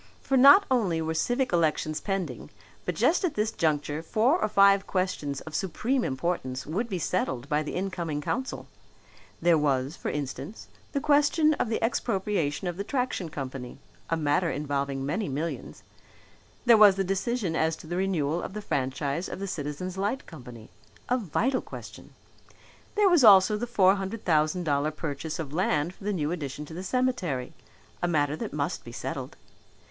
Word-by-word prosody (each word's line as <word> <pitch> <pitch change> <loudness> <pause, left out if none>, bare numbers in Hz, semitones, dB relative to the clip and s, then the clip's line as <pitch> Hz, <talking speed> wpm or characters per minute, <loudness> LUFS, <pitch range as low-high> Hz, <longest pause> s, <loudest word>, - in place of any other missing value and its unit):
For 270 - 0
not 280 +10 +8
only 200 -10 +2
were 160 0 -1
civic 245 +8 0
elections 155 -2 +1
pending 195 -3 -3 0.4
but - - -2
just 355 - +2
at 360 - 0
this 210 +1 0
juncture 150 -1 -1
four 235 - +2
or - - +2
five 200 -1 +5
questions 185 -7 -2
of 160 - -10
supreme 235 - -1
importance 130 -2 -2
would 205 +10 -2
be 190 - -2
settled 140 -7 -2
by 150 0 +1
the 150 - -5
incoming 175 -5 -2
council. 260 - -3 0.8
There 170 -2 +5
was, 140 0 0
for - - -4
instance, 140 - -5 0.2
the 280 - -1
question 300 +2 +4
of 245 - -1
the 225 - 0
expropriation 195 -9 -1
of 175 -1 -3
the 200 - -2
Traction 250 - -2
Company 130 -4 -6 0.3
(a 165 - +1
matter 155 +3 +1
involving 140 -2 -2
many 155 +6 -2
millions); 150 +5 -5 0.8
there 235 -2 +7
was 210 -3 +8
the 195 - 0
decision 195 -1 -1
as 160 0 +1
to - - -13
the 175 +2 -4
renewal 175 -4 0
of - - -6
the 210 - -5
franchise 140 +3 -2
of - - -5
the 195 - -4
Citizens' 180 +2 -4
Light 205 +7 -1
Company 125 -8 -12 0.4
a 250 - +3
vital 240 - 0
question; - - -11 0.8
there 415 -1 +4
was 345 -7 +5
also 200 -1 +8
the 235 +3 -3
four 195 -5 +4
hundred 195 +3 -5
thousand 155 +1 +2
dollar 145 -1 +1
purchase 155 0 -5
of 150 -3 -6
land 160 -1 0
for 195 - -14
the 210 - 0
new 155 -5 -1
addition 150 -3 -4
to 160 - -11
the 175 - -5
cemetery, 190 - -1 0.5
a 175 - +1
matter 150 -3 +1
that - - -5
must 150 +3 -2
be 120 - -10
settled. - - -6
175 Hz, 175 wpm, -27 LUFS, 150-210 Hz, 0.8 s, not